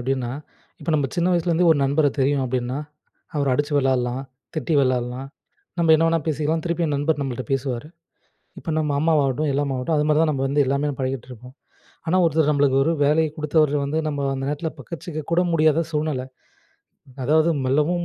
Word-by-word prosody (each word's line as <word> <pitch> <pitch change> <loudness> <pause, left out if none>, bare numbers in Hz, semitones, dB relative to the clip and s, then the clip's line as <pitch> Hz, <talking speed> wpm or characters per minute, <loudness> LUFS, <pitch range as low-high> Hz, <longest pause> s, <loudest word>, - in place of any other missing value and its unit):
எப்டின்னா, 125 -1 -2 0.5
இப்ப 165 - -3
நம்ம 145 -3 +1
சின்ன 175 +1 +2
வயசுலேருந்தே 175 0 +2
ஒரு 145 - 0
நண்பர 145 +2 +2
தெரியும் 140 0 +2
அப்டின்னா, 125 +1 -2 0.6
அவர 140 -1 0
அடிச்சு 145 +2 -1
விளையாடலாம், 130 -1 0 0.3
திட்டி 155 +1 -1
விளாடலாம், 130 0 -1 0.5
நம்ம 165 -1 +4
என்ன 165 +1 +3
வேணா 165 -1 +1
பேசிக்கலாம், 155 +1 0
திருப்பியும் 170 -3 -1
நண்பர் 145 +1 0
நம்மள்ட்ட 130 -2 -3
பேசுவாரு. 135 +1 -2 0.7
இப்ப 165 - -5
நம்ம 150 -2 0
அம்மாவாகட்டும், 150 -2 +2
எல்லாமா 140 -1 -1
ஆகட்டும் 150 +5 -1
அது 150 - +2
மாரி 150 0 +3
தான் 155 - +2
நம்ம 135 -2 -2
வந்து 145 +1 +3
எல்லாமே 140 +2 0
பழகிட்டு 130 -1 -3
இருப்போம், 125 +2 -12 0.5
ஆனா 180 +3 +2
ஒருத்தர் 160 -2 +2
நம்மளுக்கு 140 -2 +2
ஒரு 165 - +1
வேலைய 155 +2 +3
குடுத்தவர் 150 -1 +2
வந்து 150 +3 -1
நம்ம 145 -2 -2
அந்த 135 - -4
நேரத்தில 150 +3 -2
பக்கச்சிக்க 165 -2 -6
கூட 170 +1 +3
முடியாத 155 0 +3
சூழ்நெல. 150 -4 -1 1.0
அதாவது 155 +3 +3
"மெல்லவும் 150 +6 +1
145 Hz, 170 wpm, -22 LUFS, 135-160 Hz, 1.0 s, நம்ம